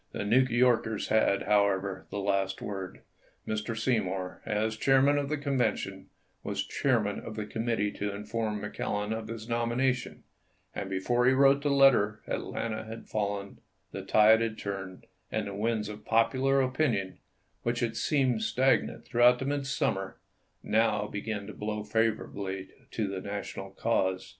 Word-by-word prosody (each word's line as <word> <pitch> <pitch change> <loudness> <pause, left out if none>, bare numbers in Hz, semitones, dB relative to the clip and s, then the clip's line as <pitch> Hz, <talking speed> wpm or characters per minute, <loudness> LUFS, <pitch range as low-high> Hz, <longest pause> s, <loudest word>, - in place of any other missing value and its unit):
The - - -3
New 115 +5 +5
Yorkers 120 -3 +2
had, 110 -2 +3
however, 100 -2 +1
the - - -5
last 100 -1 0
word. 95 -2 -6 0.5
Mr. 110 +1 -2
Seymour, 95 -6 -1
as 110 0 0
chairman 135 +4 +4
of 140 -1 -3
the 155 - 0
Convention, 135 -6 -1 0.3
was - - -3
chairman 110 -7 0
of 110 - -8
the 105 -1 -3
committee 110 -2 -1
to 105 0 -3
inform 105 +1 -3
McClellan 105 0 -2
of 110 -1 -5
his 115 -1 -7
nomination, 120 +2 -1 0.5
and 95 - -4
before 120 +6 +1
he 130 - +6
wrote 140 +1 +5
the 145 - 0
letter 135 -7 +4
At - - -2
lanta 110 -1 -4
had 115 +1 -9
fallen, 100 -2 -3 0.3
the - - -5
tide 110 +1 +5
had 115 -1 -2
turned, 95 -2 -6 0.3
and 110 - -1
the 100 - -5
winds 110 +1 -1
of 105 0 -8
popular 130 +4 +3
opinion, 130 -8 0 0.4
which 120 +1 -1
had 115 -2 -1
seemed 130 -4 +1
stagnant 130 +1 +1
throughout 120 +1 +5
the 130 - -4
midsummer, 135 -9 -1 0.5
now 110 -1 +2
began 105 0 -4
to 105 - -8
blow 105 0 -4
fav 110 0 +1
orably 95 -1 -6 0.2
to 110 -3 -2
the 95 -1 -4
National 100 -1 -5
cause. 95 -2 0
110 Hz, 155 wpm, -29 LUFS, 100-120 Hz, 0.5 s, he